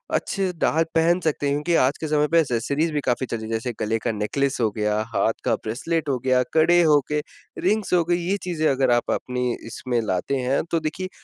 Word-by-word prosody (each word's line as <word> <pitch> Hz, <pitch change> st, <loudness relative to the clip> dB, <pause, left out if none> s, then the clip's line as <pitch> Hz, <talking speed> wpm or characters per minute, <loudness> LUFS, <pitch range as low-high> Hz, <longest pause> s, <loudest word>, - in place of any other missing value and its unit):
अच्छे 195 Hz, -1 st, -1 dB
से 180 Hz, -, -3 dB
डाल 160 Hz, +1 st, +2 dB
पहन 170 Hz, +2 st, +3 dB
सकते 150 Hz, -3 st, -1 dB
हैं 140 Hz, -, +1 dB
क्योंकि 150 Hz, +4 st, 0 dB
आज 135 Hz, +3 st, +1 dB
के 160 Hz, -, -2 dB
समय 150 Hz, 0 st, +2 dB
पे 165 Hz, +2 st, +4 dB
एक्सेसरीज 140 Hz, +3 st, 0 dB
भी 150 Hz, -1 st, -1 dB
काफ़ी 130 Hz, +1 st, 0 dB
चल 115 Hz, -, -3 dB
रही 110 Hz, -, -7 dB
है 110 Hz, -, -7 dB
जैसे 115 Hz, +2 st, -2 dB
गले 110 Hz, +1 st, 0 dB
का -, -, -1 dB
नेकलेस 135 Hz, +7 st, -1 dB
हो 110 Hz, -, +3 dB
गया, 105 Hz, 0 st, -1 dB, 0.2 s
हाथ -, -, +2 dB
का -, -, +2 dB
ब्रेसलेट 145 Hz, +7 st, -3 dB
हो 130 Hz, -, +1 dB
गया, 130 Hz, -1 st, +4 dB
कड़े 175 Hz, +2 st, +5 dB
हो 150 Hz, -2 st, +5 dB
गए, 150 Hz, 0 st, +1 dB, 0.4 s
रिंग्स 210 Hz, +1 st, 0 dB
हो 175 Hz, -1 st, +4 dB
गईं, 175 Hz, +1 st, +1 dB
ये 200 Hz, -, +1 dB
चीज़ें 165 Hz, -3 st, 0 dB
अगर 130 Hz, -2 st, +2 dB
आप 120 Hz, 0 st, +1 dB
अपनी 125 Hz, -1 st, -1 dB
इसमें 120 Hz, +1 st, -2 dB
लाते 105 Hz, +5 st, -1 dB
हैं, 130 Hz, +2 st, 0 dB
तो 165 Hz, -, +2 dB
देखिए 165 Hz, +4 st, -4 dB
140 Hz, 235 wpm, -23 LUFS, 120-165 Hz, 0.4 s, कड़े